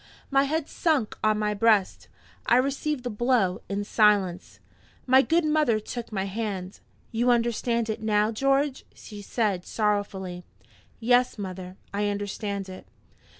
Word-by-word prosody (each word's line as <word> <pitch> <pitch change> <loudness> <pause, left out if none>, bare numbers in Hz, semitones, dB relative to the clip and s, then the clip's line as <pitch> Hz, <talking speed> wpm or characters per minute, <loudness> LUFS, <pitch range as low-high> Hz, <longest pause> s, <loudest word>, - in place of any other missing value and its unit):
My 275 0 +4
head 310 +1 -1
sunk 300 -10 0
on 215 0 +3
my 210 0 0
breast; 210 -2 +2 0.4
I 240 - +5
received 275 +1 -1
the 245 - -3
blow 215 -5 +1
in 200 +1 -2
silence. 205 -4 +2 0.5
My 260 +1 +6
good 330 +3 +1
mother 300 -8 +2
took 235 +2 -7
my 195 -3 -1
hand. 195 -2 -4 0.3
"You 235 +2 +1
understand 235 -1 +1
it 220 0 -3
now, 215 0 +2
George?" 275 +3 +1
she 210 -2 -10
said, 200 -3 -1
sorrowfully. 200 -4 -2 0.6
"Yes, 245 +2 +3
mother; 185 -2 -7 0.2
I 205 +1 0
understand 200 -1 -3
it." 185 0 -10
215 Hz, 140 wpm, -26 LUFS, 200-250 Hz, 0.6 s, My